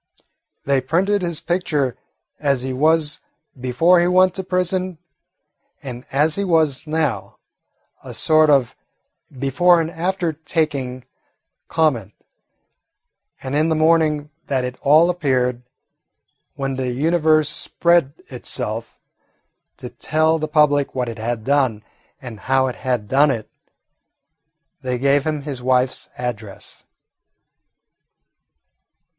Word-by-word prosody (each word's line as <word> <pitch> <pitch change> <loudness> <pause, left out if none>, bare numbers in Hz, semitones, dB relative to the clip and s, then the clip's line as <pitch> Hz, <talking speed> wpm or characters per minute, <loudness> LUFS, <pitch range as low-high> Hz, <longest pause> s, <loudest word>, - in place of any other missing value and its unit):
They 140 -1 +2
printed 190 +9 +1
his 170 -3 -3
picture 155 -8 -1 0.4
as 140 -3 0
he 130 0 -3
was 155 +2 +2 0.4
before 145 +9 +3
he 175 - +2
went 185 0 +4
to 190 - -5
prison 185 -1 -1 0.9
and 125 -2 -8
as 150 +4 +1
he 200 - 0
was 160 -6 +1
now, 150 -10 -2 0.7
a - - -9
sort 155 -1 +3
of 135 -5 +3 0.6
before 155 +7 +3
and 165 0 -2
after 175 -1 -2
taking 145 -5 -3 0.6
comment, 125 - 0 1.3
and 130 +1 -3
in 155 +2 +2
the 160 - +1
morning 155 -2 +2 0.2
that 130 -2 0
it 125 0 -5
all 155 +4 +5
appeared, 130 -7 0 0.9
when 135 -1 -3
the 130 -1 -2
Universe 155 +3 +2
spread 170 -2 +1
itself 115 -3 -5 0.8
to - - -8
tell 160 +1 +1
the 155 - -2
public 150 -3 +2
what 125 -2 -1
it 115 -1 -8
had 115 0 -3
done 130 -5 +1 0.4
and 120 -6 -9
how 135 0 +3
it 130 - -4
had 125 -5 -2
done 140 +6 +4
it, 115 -5 -3 1.3
they 125 -1 -2
gave 140 +3 +2
him 150 -2 -2
his 140 -4 -6
wife's 125 0 0
address. 110 -5 -7
145 Hz, 120 wpm, -20 LUFS, 130-160 Hz, 1.3 s, all